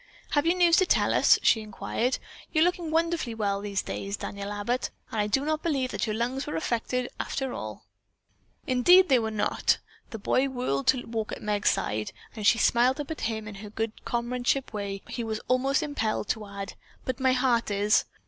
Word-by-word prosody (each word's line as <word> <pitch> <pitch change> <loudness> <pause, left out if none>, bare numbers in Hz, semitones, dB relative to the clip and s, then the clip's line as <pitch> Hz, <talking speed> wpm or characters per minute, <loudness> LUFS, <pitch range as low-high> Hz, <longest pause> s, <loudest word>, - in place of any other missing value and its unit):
"Have 290 +2 +2
you 345 - +4
news 345 -2 +5
to 375 - +5
tell - - +3
us?" - - +6
she 220 - +4
inquired. 220 +4 -2 0.3
"You're 310 -1 +4
looking 350 -2 0
wonderfully 325 -7 0
well 200 -2 -1
these 200 -1 -2
days, 200 +1 -4
Daniel 200 0 -5
Abbott. 205 +5 -1 0.2
I 210 -2 0
do 270 +7 +1
not 310 0 0
believe 270 -6 0
that - - -2
your 215 - -1
lungs 250 +4 -2
were - - -3
affected, 240 +8 -1
after 265 -2 -2
all." 105 -1 -7 0.8
"Indeed, 355 +9 +6
they 260 -3 +5
were 220 -1 -1
not!" 215 -1 +1 0.3
The 225 - -6
boy 260 +6 +1
whirled 245 - -2
to 255 - +3
walk 225 -2 -3
at - - -7
Meg's 210 -1 +2
side, 105 0 -1 0.2
and - - -10
as 210 - +1
she 230 - +6
smiled 250 +4 +3
up 295 +1 -4
at 315 - -5
him 220 -1 -2
in 210 - -7
her 210 - -8
good 225 +1 -4
comradeship 245 +2 -1
way, 200 -2 -4
he 240 - -4
was 220 -1 -3
almost 265 +2 +2
impelled 225 -9 -2
to 215 -2 -2
add, 200 -1 -6 0.3
"But 255 0 -3
my 260 -1 +3
heart 250 -3 +2
is." 205 +2 +3
235 Hz, 200 wpm, -27 LUFS, 210-270 Hz, 0.8 s, us